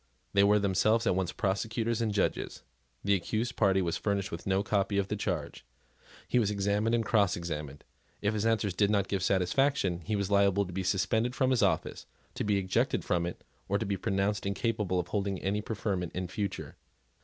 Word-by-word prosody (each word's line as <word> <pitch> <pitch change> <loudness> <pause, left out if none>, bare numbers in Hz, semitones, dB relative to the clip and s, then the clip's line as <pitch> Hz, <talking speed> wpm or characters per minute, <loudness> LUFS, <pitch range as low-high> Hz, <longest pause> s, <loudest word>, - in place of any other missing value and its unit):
They 100 - +5
were 105 +1 +5
themselves 105 +3 +2
at 95 - +2
once 95 -2 -1
prosecutors 110 +2 -1
and 110 -2 0
judges. 100 -1 -1 0.4
The 100 - +3
accused 110 +6 -1
party 95 -3 +3
was 85 -1 -1
furnished 100 -2 -1
with 85 +2 -6
no 95 +1 +2
copy 100 -1 0
of 100 -1 0
the 105 - -1
charge. 105 - -3 0.6
He 125 - +2
was 105 -4 +2
examined 105 +3 +1
and 115 -1 0
crossexamined. 85 - 0 0.4
If 105 +1 0
his 105 -1 -1
answers 110 -4 +1
did 100 +2 +2
not 100 -2 +2
give 100 -2 -1
satisfaction, 95 +1 +1
he 105 +5 -1
was 100 -1 -2
liable 100 0 +3
to 90 - -9
be 95 - -2
suspended 100 +6 0
from 130 -1 +2
his 125 - +2
office, - - 0 0.3
to - - -3
be 105 -1 +2
ejected 95 -1 0
from 85 -1 +1
it, 85 - -7 0.3
to 100 +2 +1
be 100 -1 -1
pronounced 100 0 -1
incapable 100 -3 0
of 90 0 -4
holding 100 -1 -1
any 100 +3 -1
preferment 100 -5 -3
in 90 0 -3
future. 100 +2 -4
100 Hz, 190 wpm, -30 LUFS, 95-110 Hz, 0.6 s, They